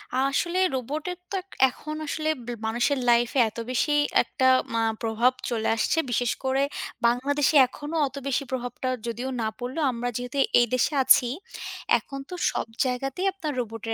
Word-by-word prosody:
আসলে 275 +7 +1 0.2
রোবটের 300 +8 -3
তো - - -2
এক 380 - -31 0.2
এখন 305 +4 -7
আসলে 310 +1 -1 0.2
ব - - -17 0.2
মানুষের 240 +5 +1
লাইফে 240 +3 +3
এত 215 - -16
বেশি 255 +4 +1 0.3
একটা 260 - -2 0.3
মা 230 - +1 0.2
প্রভাব 235 +2 +2 0.2
চলে 225 -2 -1
আসছে, 225 +8 0
বিশেষ 245 0 +1
করে 265 +1 +1 0.4
বাংলাদেশে 280 +5 +2
এখনো 295 +5 -7
অত 265 - -11
বেশি 275 +1 0
প্রভাবটা 255 0 -3 0.2
যদিও 240 +3 -3
না 220 - 0
পড়লেও। 255 +6 -3
আমরা 245 0 -3
যেহেতু 245 +2 -5 0.2
এই 240 - +5
দেশে 255 +4 +2
আছি, 255 -1 +6 0.7
এখন 275 - -8
তো 360 - -5 0.2
সব - - -2 0.2
জায়গাতেই 270 +8 -1
আপনার 325 -6 -4
রোবটের 225 -1 -4
255 Hz, 160 wpm, -26 LUFS, 240-290 Hz, 0.7 s, আছি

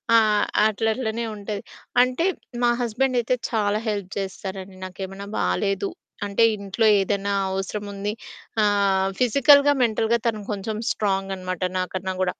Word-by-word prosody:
ఆహ్, 215 -2 +4 0.2
అట్లట్లనే 220 +2 -1
ఉంటది. 205 0 -5 0.4
అంటే 255 +6 +2 0.4
మా 240 - +5
హస్బెండ్ 245 +2 0
అయితే 245 +2 +1
చాలా 210 -2 +1
హెల్ప్ 200 -3 -2
చేస్తారండి. 190 0 -6
నాకేమైనా 195 +1 -7
బాలేదు 190 - 0 0.4
అంటే, 200 +3 +2
ఇంట్లో 200 +3 -1
ఏదైనా 200 +1 0 0.2
అవసరం 195 +2 -3
ఉంది 200 +1 -3 0.5
ఆహ్, 200 -2 +2
ఫిజికల్‌గా 280 +4 +6
మెంటల్‌గా 225 0 +2
తను 215 -2 -1
కొంచెం 210 +2 -4
స్ట్రాంగ్ 195 -2 -1
అనమాట 185 -1 -4 0.2
నాకన్నా 185 +1 -3
గూడా. 185 - +2
205 Hz, 125 wpm, -24 LUFS, 195-225 Hz, 0.5 s, ఫిజికల్‌గా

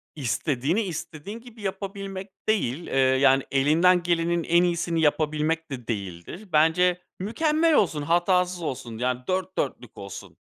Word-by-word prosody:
İstediğini, 145 - 0
istediğin 185 +1 -6
gibi 235 -2 -14
yapabilmek 195 0 -5 0.2
değil, 170 - 0
eee, - - -4
yani, 130 0 +4
elinden 165 +6 +4
gelenin 170 0 +1
en 170 +2 +3
iyisini 170 -1 0
yapabilmek 155 +1 0
de 125 -4 -6
değildir. 100 - -6
Bence, 175 +4 +3 0.2
mükemmel 310 - +1
olsun, 165 - +2
hatasız 175 +3 +1
olsun, 125 -7 -5
yani, 125 +1 -1
dört 185 0 -2
dörtlük 125 -4 -3
olsun, 100 -3 -9
165 Hz, 130 wpm, -25 LUFS, 135-185 Hz, 0.2 s, yani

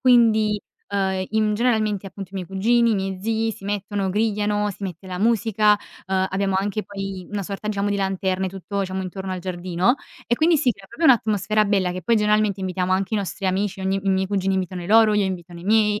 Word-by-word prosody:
Quindi, 220 -4 +4 0.3
uhm, 190 -2 0
in 215 -1 +1
generalmente 215 -4 +1
appunto 195 -1 -9
i - - -13
miei 185 -2 -4
cugini, 230 +5 +3
i - - +2
miei 190 -1 -3
zii 225 +1 0
si 195 - -12
mettono, 200 -1 -2
grigliano, 210 0 0
si 200 +1 -11
mette 190 -1 -6
la 180 -1 -5
musica, 215 -2 +3 0.3
uhm, 190 0 +1
abbiamo 195 0 0
anche 205 +2 -1
poi 195 -2 -6
una 205 -1 -3
sorta, 200 +2 -5
diciamo, 205 -1 0
di 205 - 0
lanterne 190 -1 -1
tutto 195 +2 -4
diciamo 190 0 -2
intorno 190 +1 -5
al 185 - -3
giardino 180 +4 0 0.3
e 240 - +2
quindi 320 +5 +3
si 255 -4 +2
crea 200 -2 -16
proprio 335 - -4
un'atmosfera 215 - +3
bella. 195 -3 +1
Che 185 0 -6
poi 230 +7 +3
generalmente 210 -1 +2
invitiamo 185 -1 -2
anche 190 +3 +1
i - - +2
nostri 195 0 -3
amici, 195 +1 -1
ogni 190 +1 0
i 195 - +1
miei 190 0 +1
cugini 195 -1 0
invitano 185 -1 -2
i - - -7
loro, 220 0 +6
io 210 -1 +3
invitano 175 -2 -5
i - - -11
miei. 210 0 +3
200 Hz, 220 wpm, -23 LUFS, 190-215 Hz, 0.3 s, loro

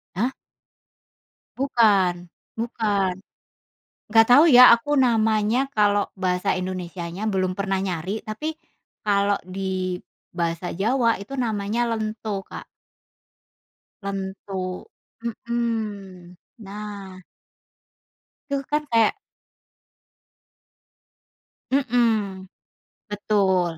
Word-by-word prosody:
Hah? 230 +8 +1 1.3
Bukan 195 -9 +2 0.3
bukan. 210 -5 0 0.9
Enggak 225 +1 +5
tahu 290 +6 +8
ya 250 -4 +9
aku 265 +6 -2
namanya, 225 -1 +2
kalau 205 -1 +3
bahasa 180 -2 0
Indonesianya 180 +1 -4
belum 185 -2 -1
pernah 195 -1 -1
nyari, 190 +3 -3
tapi 300 +9 -4 0.5
kalau 200 -1 +2
di 185 -1 -3 0.3
bahasa 170 0 -2
Jawa 230 +5 +1
itu 200 +8 -8
namanya 230 -1 -1
lento, 215 -2 -3
Kak. - - -9 1.4
Lento, 190 -1 -5 0.3
mhm, 220 -6 -4 0.2
nah 200 -2 -8 1.3
Tuh 275 -1 -2
kan 300 0 0
kayak 230 - +4 2.6
Mmm, 225 -7 +1 0.6
betul. 190 -5 +1
205 Hz, 80 wpm, -23 LUFS, 185-230 Hz, 2.6 s, ya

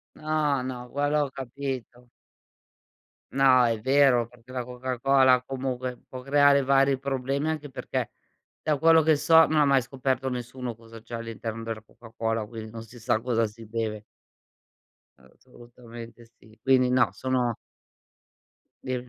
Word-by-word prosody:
No, 155 -3 0
no, 125 -1 -6
quello 145 +2 +1
ho - - -7
capito. 130 -2 -6 1.2
No, 130 -2 +5
è 115 -2 +1
vero 130 -1 +3
perché 120 +1 -18
la 125 -1 -3
Coca-Cola 130 +1 +2
comunque 130 -1 -4
può 130 - -7
creare 140 0 +4
vari 135 0 +3
problemi 135 +2 -2
anche 150 -2 -4
perché, 130 - -4 0.5
da 150 -3 0
quello 160 0 +6
che 155 0 +4
so 160 +2 +6
non 155 - +1
ha 150 - +5
mai 135 -2 +3
scoperto 130 +1 -2
nessuno 125 -1 -5
cosa 115 0 -13
c'è 115 - -14
all'interno 115 -1 -5
della 115 -1 -5
Coca-Cola, 115 -1 -4
quindi 110 -1 -8
non 115 0 -8
si 115 +2 -13
sa 115 -1 0
cosa 115 -2 +1
si 110 +1 -10
beve. 110 -1 -3 1.1
Assolutamente 115 - -14
sì, 110 0 -20
quindi 130 -1 +3
no, 125 0 +3
sono 125 -3 -1 1.3
Di 130 - -2
125 Hz, 140 wpm, -26 LUFS, 115-135 Hz, 1.3 s, quello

